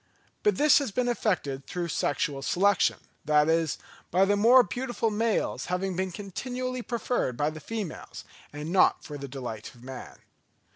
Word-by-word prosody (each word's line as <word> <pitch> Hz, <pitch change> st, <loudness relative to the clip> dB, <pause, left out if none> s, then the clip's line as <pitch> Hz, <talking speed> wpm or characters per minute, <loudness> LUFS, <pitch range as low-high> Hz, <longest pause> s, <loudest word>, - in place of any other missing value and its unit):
But 420 Hz, -, +3 dB
this 300 Hz, +1 st, +6 dB
has 280 Hz, -, -2 dB
been 245 Hz, +4 st, -1 dB
effected 170 Hz, -, -1 dB
through 175 Hz, -1 st, -3 dB
sexual 145 Hz, -2 st, -1 dB
selection, 195 Hz, +7 st, +2 dB, 0.3 s
that 150 Hz, 0 st, +3 dB
is, 165 Hz, -1 st, +1 dB, 0.3 s
by 185 Hz, +3 st, +4 dB
the 205 Hz, +1 st, +2 dB
more 240 Hz, +5 st, +7 dB
beautiful 240 Hz, -1 st, -2 dB
males 220 Hz, +1 st, 0 dB
having 180 Hz, +1 st, -2 dB
been 185 Hz, +1 st, -1 dB
continually 250 Hz, +7 st, -4 dB
preferred 235 Hz, -, -2 dB
by 145 Hz, +3 st, +1 dB
the 155 Hz, -, -8 dB
females, 210 Hz, +1 st, -6 dB, 0.3 s
and 150 Hz, +3 st, -6 dB
not 185 Hz, -, +4 dB
for 145 Hz, -1 st, -7 dB
the 140 Hz, -, -6 dB
delight 125 Hz, -4 st, -7 dB
of 120 Hz, -, -17 dB
man. 130 Hz, -1 st, -9 dB
185 Hz, 160 wpm, -28 LUFS, 150-230 Hz, 0.3 s, more